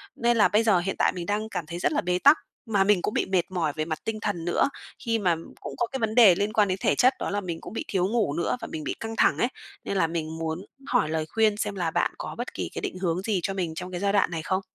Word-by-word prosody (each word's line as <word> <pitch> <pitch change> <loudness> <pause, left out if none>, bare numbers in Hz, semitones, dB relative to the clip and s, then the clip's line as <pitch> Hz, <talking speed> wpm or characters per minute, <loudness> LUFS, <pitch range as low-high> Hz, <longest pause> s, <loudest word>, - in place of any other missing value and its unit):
Nên 235 0 +2
là 210 - +6
bây 215 +2 +2
giờ 210 -5 +4
hiện 195 +3 -2
tại - - +4
mình 175 -1 -4
đang 210 +2 -1
cảm 170 - -4
thấy 170 +2 -6
rất - - +1
là 300 - +1
bế 180 0 0
tắc, 285 +9 +7 0.3
mà 205 -4 +2
mình 200 -2 +3
cũng 210 - -2
bị - - +1
mệt 185 -2 0
mỏi 165 -5 0
về 155 -1 -1
mặt 155 -1 -3
tinh 220 -1 -2
thần 175 -5 -2
nữa, 175 - +2 0.3
khi 230 -2 0
mà 180 -5 +2 0.3
cũng - - -6
có 240 - 0
cái 265 +3 -5
vấn 220 -2 -1
đề 220 -7 +8
liên 205 +3 -1
quan 210 -3 +4
đến 185 0 -1
thể - - +2
chất 255 +2 +5
đó - - -2
là 205 +1 -1
mình 170 -4 -5
cũng - - -9
bị - - -3
thiếu 185 -2 +1
ngủ 215 -8 +1
nữa 170 +9 -1
và - - -5
mình 155 - -5
bị - - -3
căng 225 0 -5
thẳng - - +3
ấy. 240 - +2 0.4
Nên 200 - -2
là 165 - +3
mình 160 -1 -4
muốn 165 +3 -3 0.2
hỏi 240 -11 +2
lời 160 0 -1
khuyên 220 -2 +2
xem 210 -1 -2
là 175 -4 -1
bạn - - +1
có - - -6
bất - - -5
kỳ - - -4
cái - - -4
định 185 - -4
hướng 180 -1 0
gì 200 -1 0
cho 195 - -1
mình 175 -4 -3
trong 180 +2 -6
cái 175 - -4
giai 200 +1 +1
đoạn 200 -4 +3
này 165 -2 -3
không? 185 +3 0
195 Hz, 310 wpm, -26 LUFS, 170-215 Hz, 0.4 s, đề